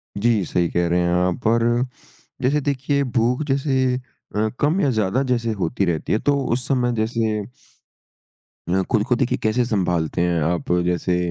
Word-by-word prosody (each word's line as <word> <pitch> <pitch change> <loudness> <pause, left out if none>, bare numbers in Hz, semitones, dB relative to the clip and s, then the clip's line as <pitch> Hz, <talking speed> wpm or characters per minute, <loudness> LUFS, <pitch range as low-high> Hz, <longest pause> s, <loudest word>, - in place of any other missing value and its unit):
जी, 110 -1 +2
सही 85 0 0
कह 85 0 0
रहे 90 +1 +2
हैं 85 0 +1
आप 90 +5 0
और 115 +1 +3 0.8
जैसे 140 +3 +2
देखिए, 140 0 0
भूख 125 +2 0
जैसे 135 -2 +1 0.4
अ, 105 +1 +2
कम 155 +6 +2
या 140 - +2
ज़्यादा 110 +2 +1
जैसे 115 -2 +1
होती 100 +3 0
रहती 85 -3 -1
है 110 - +2
तो 145 - +4 0.2
उस 125 +1 -1
समय 125 -3 +1
जैसे 115 0 0 1.4
अ, 95 +2 +2
खुद 110 -4 +3
को 125 - +3
देखिए 125 +1 0
कैसे 110 +3 +2
सँभालते 90 -7 0
हैं 85 -2 +1
आप? 85 -1 -1
जैसे 90 0 0
115 Hz, 170 wpm, -22 LUFS, 90-130 Hz, 1.4 s, तो